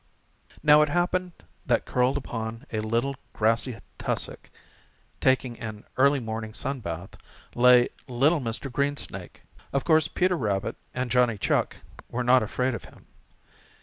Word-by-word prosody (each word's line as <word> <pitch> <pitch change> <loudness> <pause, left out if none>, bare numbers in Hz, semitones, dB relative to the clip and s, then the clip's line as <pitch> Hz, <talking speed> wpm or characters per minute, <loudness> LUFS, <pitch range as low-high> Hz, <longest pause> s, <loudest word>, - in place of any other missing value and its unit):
Now 150 0 +7
it 150 - +3
happened 175 +2 0 0.3
that - - +1
curled 125 +1 +1
up 140 - -7
on 115 0 -4
a 110 - 0
little 115 +5 0 0.2
grassy 115 +2 +1 0.2
tussock, - - -3 0.7
taking 130 -2 +1
an 110 -2 -7
early 140 +2 +4
morning 110 -2 -5
sun 135 0 -2
bath, 85 -3 -6 0.4
lay 125 0 +6 0.2
little 140 +6 +3
Mr. 125 +2 -4
Greensnake. 140 +3 -3 0.3
Of 140 - 0
course 160 -1 +4
Peter 185 0 +1
Rabbit 105 - -1 0.2
and 125 -1 -2
Johnny 125 -3 +3
Chuck 100 - 0 0.3
were 125 +1 -2
not 125 +1 +5
afraid 125 +4 -1
of 115 - -6
him. - - -17
125 Hz, 145 wpm, -26 LUFS, 115-140 Hz, 0.7 s, Now